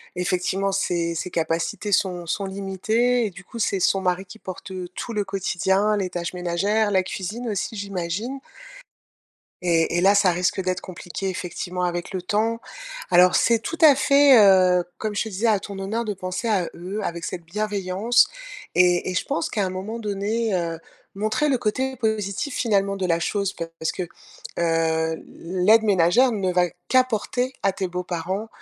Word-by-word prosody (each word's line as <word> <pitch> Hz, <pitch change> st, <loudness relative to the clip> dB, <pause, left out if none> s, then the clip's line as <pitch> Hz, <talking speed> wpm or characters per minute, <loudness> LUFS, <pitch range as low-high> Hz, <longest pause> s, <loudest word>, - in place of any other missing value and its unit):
effectivement 185 Hz, +2 st, 0 dB
ses 175 Hz, -3 st, 0 dB
ses 170 Hz, +2 st, -4 dB
capacités 165 Hz, +5 st, -2 dB
sont 180 Hz, -2 st, +1 dB
sont 195 Hz, +4 st, -2 dB
limitées 215 Hz, +6 st, 0 dB
et 205 Hz, -, -3 dB
du 190 Hz, +2 st, -12 dB
coup, 230 Hz, -, -10 dB
c'est 195 Hz, -3 st, 0 dB
son 195 Hz, -, +3 dB
mari 185 Hz, 0 st, 0 dB
qui 190 Hz, +4 st, -13 dB
porte, 190 Hz, 0 st, -8 dB
heu, 185 Hz, -1 st, -5 dB
tout 235 Hz, -, -5 dB
le 210 Hz, -2 st, -1 dB
quotidien, 195 Hz, +2 st, +1 dB
les 190 Hz, -2 st, -1 dB
tâches 175 Hz, 0 st, -4 dB
ménagères, 195 Hz, +5 st, 0 dB
la 190 Hz, -2 st, +2 dB
cuisine 210 Hz, +6 st, -5 dB
aussi, 210 Hz, +2 st, -3 dB
j'imagine? 200 Hz, +5 st, -4 dB, 1.2 s
Et 170 Hz, -1 st, +2 dB
et -, -, +2 dB
là 195 Hz, +2 st, +5 dB
ça 195 Hz, -3 st, +5 dB
risque 180 Hz, +2 st, 0 dB
d'être 185 Hz, 0 st, -2 dB
compliqué, 185 Hz, +1 st, -5 dB
effectivement, 180 Hz, 0 st, -4 dB
avec 175 Hz, 0 st, -2 dB
le 185 Hz, -, -2 dB
temps. 220 Hz, +5 st, 0 dB, 0.5 s
Alors, 180 Hz, +1 st, +6 dB
c'est 230 Hz, -1 st, +4 dB
tout 330 Hz, +9 st, -5 dB
à 295 Hz, -4 st, +8 dB
fait, 280 Hz, -1 st, +6 dB
heu, 185 Hz, -3 st, +6 dB
comme 215 Hz, -1 st, -3 dB
je -, -, +1 dB
te 220 Hz, -, -6 dB
disais, 210 Hz, +4 st, -1 dB
à 210 Hz, -3 st, +3 dB
ton 200 Hz, 0 st, -8 dB
honneur 215 Hz, +4 st, -2 dB
de 210 Hz, -, -2 dB
penser 185 Hz, +4 st, -4 dB
à 190 Hz, -6 st, +1 dB
eux, 185 Hz, +5 st, -5 dB
avec 170 Hz, -2 st, -4 dB
cette 175 Hz, -2 st, -5 dB
bienveillance, 210 Hz, +4 st, +1 dB, 0.5 s
et 180 Hz, 0 st, +3 dB
et -, -, -4 dB
je 185 Hz, -, -1 dB
pense 165 Hz, -, -1 dB
qu'à 210 Hz, -, -1 dB
un 185 Hz, -, -1 dB
moment 200 Hz, +5 st, -5 dB
donné, 210 Hz, +1 st, -1 dB
heu, 165 Hz, -2 st, -2 dB, 0.3 s
montrer 215 Hz, +9 st, 0 dB
le 260 Hz, -, +2 dB
côté 260 Hz, +4 st, -1 dB
positif, 220 Hz, +3 st, -2 dB
finalement, 200 Hz, -4 st, +1 dB
de 190 Hz, -1 st, -2 dB
la 170 Hz, -1 st, +1 dB
chose 200 Hz, +2 st, -1 dB
parce 165 Hz, -1 st, -4 dB
que, 185 Hz, -, -4 dB, 0.6 s
heu, 160 Hz, -1 st, +1 dB
l'aide 185 Hz, +6 st, +2 dB
ménagère 205 Hz, +6 st, +4 dB
ne 195 Hz, -4 st, -1 dB
va 180 Hz, -1 st, +3 dB, 0.2 s
qu'apporter 255 Hz, 0 st, +1 dB
à 195 Hz, -1 st, +2 dB
tes 190 Hz, -1 st, -2 dB
beaux-parents 180 Hz, +3 st, -3 dB
195 Hz, 180 wpm, -23 LUFS, 180-215 Hz, 1.2 s, à